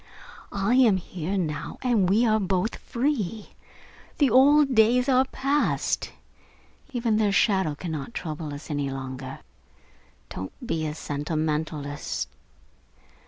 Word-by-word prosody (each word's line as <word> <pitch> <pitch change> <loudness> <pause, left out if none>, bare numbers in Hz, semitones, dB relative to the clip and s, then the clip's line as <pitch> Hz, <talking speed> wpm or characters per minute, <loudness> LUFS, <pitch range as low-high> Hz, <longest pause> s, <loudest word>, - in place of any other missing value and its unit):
I 200 +4 0
am 230 -7 +5
here 180 +1 -4
now 155 -5 -3
and 225 -8 +2
we 220 +5 +4
are 220 -1 +3
both 190 +2 -1
free. 230 -5 -2 0.7
The 280 -4 +3
old 280 +1 +6
days 240 +3 +4
are 260 -1 +4
passed. 275 +2 0 0.8
Even 235 -4 +1
their 210 -2 +2
shadow 190 -5 +2
cannot 160 - -5
trouble 155 -2 -4
us 145 +2 -8
any 145 -1 -1
longer. 130 0 -6 0.9
Don't 95 0 -6
be 160 -9 -1
a 150 - -4
sentimentalist. 150 -1 -3
190 Hz, 115 wpm, -26 LUFS, 150-235 Hz, 0.9 s, old